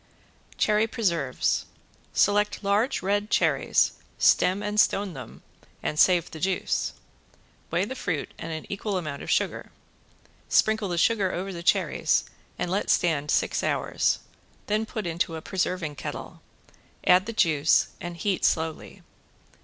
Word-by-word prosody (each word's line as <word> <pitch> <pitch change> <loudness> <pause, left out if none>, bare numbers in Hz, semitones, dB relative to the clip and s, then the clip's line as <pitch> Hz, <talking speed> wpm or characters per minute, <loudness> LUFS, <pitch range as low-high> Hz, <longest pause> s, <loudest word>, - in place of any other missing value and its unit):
~CHERRY 215 +1 +3
PRESERVES~ 170 - 0 0.4
Select 205 +1 +2
large 205 +4 +1
red 205 +2 0
cherries, - - +2 0.3
stem 190 +3 +3
and 210 0 -1
stone 200 -2 +2
them, 130 -4 -10 0.4
and 150 - -2
save 180 -2 +4
the 160 - -8
juice. 190 +2 -1 0.8
Weigh 175 +3 +1
the 260 - -5
fruit 180 - -3
and 165 - -5
an 160 -1 -5
equal 200 0 -3
amount 150 -5 -5
of - - -7
sugar. - - 0 0.8
Sprinkle 220 -1 +3
the 175 - -2
sugar 195 +1 +2
over 190 +2 -4
the 170 - -6
cherries 170 - +2 0.3
and 175 - -2
let 200 +2 -1
stand 150 -4 +2
six - - +1
hours, - - 0 0.5
then 215 +1 0
put 215 -3 -5
into 165 -1 -1
a 160 - -6
preserving 180 -4 -2
kettle, 130 - -7 0.6
add 185 +3 +5
the - - -2
juice, 160 -8 +3
and 175 0 -6
heat 190 +2 -1
slowly. 160 -1 -1
185 Hz, 140 wpm, -26 LUFS, 165-205 Hz, 0.8 s, add